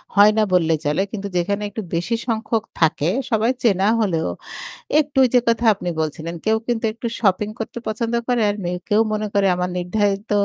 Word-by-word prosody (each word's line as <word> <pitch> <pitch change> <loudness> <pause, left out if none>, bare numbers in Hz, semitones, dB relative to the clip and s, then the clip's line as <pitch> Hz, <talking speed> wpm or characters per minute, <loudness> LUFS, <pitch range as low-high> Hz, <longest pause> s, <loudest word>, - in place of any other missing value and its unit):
হয় 205 +1 +7
না 215 - +4
বললেই 165 -3 +3
চলে। 150 +6 +1
কিন্তু 200 -2 -4
যেখানে 200 +4 0
একটু 215 +2 -5
বেশি 175 +8 0
সংখ্যক 225 -1 -1 0.2
থাকে, 160 0 +2 0.2
সবাই 225 +3 +2
চেনা 195 -3 +3
হলেও 170 -7 0 0.7
একটু 295 -2 -3
ঐ - - +6
যে 245 - +7
কথা 230 +1 +1
আপনি 180 -2 -6
বলছিলেন, 160 +2 -3
কেউ 220 0 +3
কিন্তু 235 -2 -1
একটু 235 +1 -6
শপিং 205 -1 +1
করতে 225 +1 -5
পছন্দ 230 +2 -2
করে। 245 -2 +2
আর 205 - -3
মেউ 180 +1 -2
কেউ 210 0 +3
মনে 215 0 -1
করে, 200 -1 +3
"আমার 180 0 -2
নির্ধারিত 200 +3 -1
205 Hz, 190 wpm, -21 LUFS, 180-225 Hz, 0.7 s, হয়